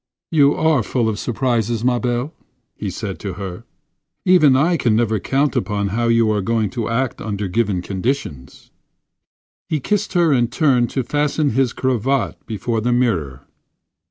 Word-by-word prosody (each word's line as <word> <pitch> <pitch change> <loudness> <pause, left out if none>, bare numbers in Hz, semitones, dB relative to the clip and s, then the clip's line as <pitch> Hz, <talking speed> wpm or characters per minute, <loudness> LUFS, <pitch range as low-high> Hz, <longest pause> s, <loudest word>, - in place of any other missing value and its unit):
"You 145 -3 +4
are 160 -4 +2
full 115 +2 -1
of 110 -2 -2
surprises, 120 -2 -1
ma 125 -1 +2
belle," 125 +5 -2 0.4
he 100 - -4
said 100 0 -5
to 100 -3 -5
her. 95 -1 -7 0.6
"Even 175 -8 +5
I 160 +6 +3
can 120 -8 +1
never 110 -2 +1
count 135 +8 0
upon 100 0 -1
how 115 +4 0
you 115 -1 +3
are 105 -1 0
going 110 +1 0
to 120 -4 -3
act 125 +2 -1
under 105 -2 -3
given 100 -2 0
conditions." 95 - -4 1.0
He 155 - 0
kissed 210 +8 -1
her 170 -3 +3
and 120 -3 +2
turned 130 -5 +2
to 130 - -2
fasten 145 +2 0
his 130 0 +1
cravat 130 +1 -1
before 110 +1 -2
the 120 +3 0
mirror. 85 - 0
120 Hz, 160 wpm, -20 LUFS, 105-135 Hz, 1.0 s, Even